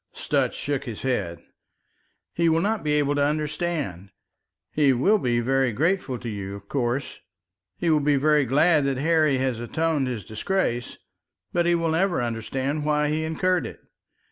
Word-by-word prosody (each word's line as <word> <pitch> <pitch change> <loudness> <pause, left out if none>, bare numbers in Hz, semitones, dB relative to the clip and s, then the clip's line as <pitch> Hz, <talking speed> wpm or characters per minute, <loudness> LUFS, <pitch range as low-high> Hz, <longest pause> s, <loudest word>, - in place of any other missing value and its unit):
Sutch - - -1
shook 140 -1 -3
his 115 -5 -7
head. 90 -10 -2 0.9
"He 170 0 +2
will 160 0 +3
not 215 +3 0
be 150 -1 0
able 145 -1 +2
to 145 0 +1
understand. 150 - -2 0.6
He 145 -3 +3
will 195 - +3
be 120 -6 +1
very 135 +1 +1
grateful 155 - 0
to 120 - -8
you, 100 -3 -5
of 100 0 -12
course. 130 +1 -2 0.6
He 170 - +1
will 155 - +4
be 145 0 +2
very 150 +1 +3
glad 150 +4 +3
that 135 -1 0
Harry 155 -1 +2
has 130 -3 -1
atoned 150 +3 -1
his 115 -7 -4
disgrace, 120 - -2 0.6
but 175 0 +2
he 175 - +4
will 165 -1 0
never 180 +2 +1
understand 130 +5 -2
why 150 0 +1
he 155 +1 -1
incurred 175 +3 0
it. - - -11
145 Hz, 170 wpm, -24 LUFS, 125-160 Hz, 0.9 s, will